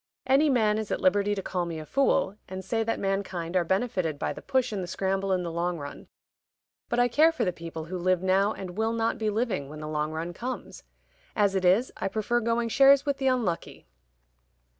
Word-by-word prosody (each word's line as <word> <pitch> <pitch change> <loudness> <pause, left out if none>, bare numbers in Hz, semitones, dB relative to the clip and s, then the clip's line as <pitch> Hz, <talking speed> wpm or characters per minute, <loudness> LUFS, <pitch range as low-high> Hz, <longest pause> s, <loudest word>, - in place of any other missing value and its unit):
Any 275 +3 +4
man 220 -5 +2
is 215 - -4
at - - -1
liberty 205 +2 +2
to 195 - -4
call 180 -2 -2
me 165 -1 -5
a 155 - -7
fool, 260 - +1
and 190 0 -6
say 225 +3 0
that 225 +1 -1
mankind 190 -3 -2
are 180 - +4
benefited 185 -4 -1
by - - -2
the - - -10
push 260 -3 0
and 205 -3 -3
the 180 - -5
scramble 195 +1 -1
in 185 -1 +1
the 170 - -4
long 170 +1 -1
run. 145 -2 -8 0.8
But 240 - -1
I 245 0 +4
care 310 +7 +4
for 255 -8 -1
the 180 - 0
people 165 -2 -7
who 180 +2 -5
live 185 0 +1
now 195 +2 +3
and 190 -4 -6
will 220 +2 0
not 230 +1 0
be 215 -1 0
living 210 - -1
when 155 +1 -9
the 155 - -6
long 155 0 -2
run 165 +2 -4
comes. 250 +8 -6 0.5
As 205 -2 +3
it 190 -1 0
is, 200 +8 +4
I - - -2
prefer 220 +4 0
going 230 0 0
shares 275 +3 +6
with 280 -1 0
the 270 -1 -1
unlucky." 230 -10 -1
195 Hz, 225 wpm, -27 LUFS, 175-230 Hz, 0.8 s, shares